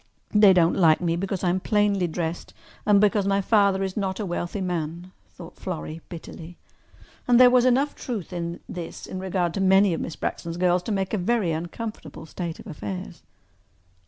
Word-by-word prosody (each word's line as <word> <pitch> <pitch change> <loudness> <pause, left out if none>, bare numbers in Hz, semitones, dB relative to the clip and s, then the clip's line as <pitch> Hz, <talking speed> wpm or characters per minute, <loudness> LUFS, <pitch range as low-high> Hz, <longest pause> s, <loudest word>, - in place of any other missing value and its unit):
"They 210 -2 +7
don't 175 -2 +4
like 160 -4 +4
me 170 -2 0
because 190 +1 -3
I 175 - +2
am 185 - 0
plainly 205 -2 +1
dressed 170 0 -4 0.3
and 205 -1 +6
because 205 -1 +2
my 195 0 +2
father 200 -1 +3
is 190 -1 -3
not 190 -3 -2
a 210 - -2
wealthy 175 +2 -3
man," 175 -1 -4 0.2
thought 170 -1 -12
Florrie 165 -3 -6
bitterly. 170 0 -10 0.7
And 245 -1 +5
there 250 -1 +8
was 250 -1 +4
enough 265 +3 +2
truth 210 -7 -6
in 170 -1 -4
this 175 -2 -7
in 185 - -6
regard 185 -2 -1
to 195 - -2
many 190 0 +4
of - - -3
Miss 165 - -5
Braxton's 170 0 -4
girls 180 0 +2
to 220 - -4
make 195 -1 -1
a 210 - +1
very 200 -2 +1
uncomfortable 165 -1 -6
state 165 +1 -5
of - - -11
affairs. 185 0 -7
185 Hz, 190 wpm, -25 LUFS, 170-200 Hz, 0.7 s, there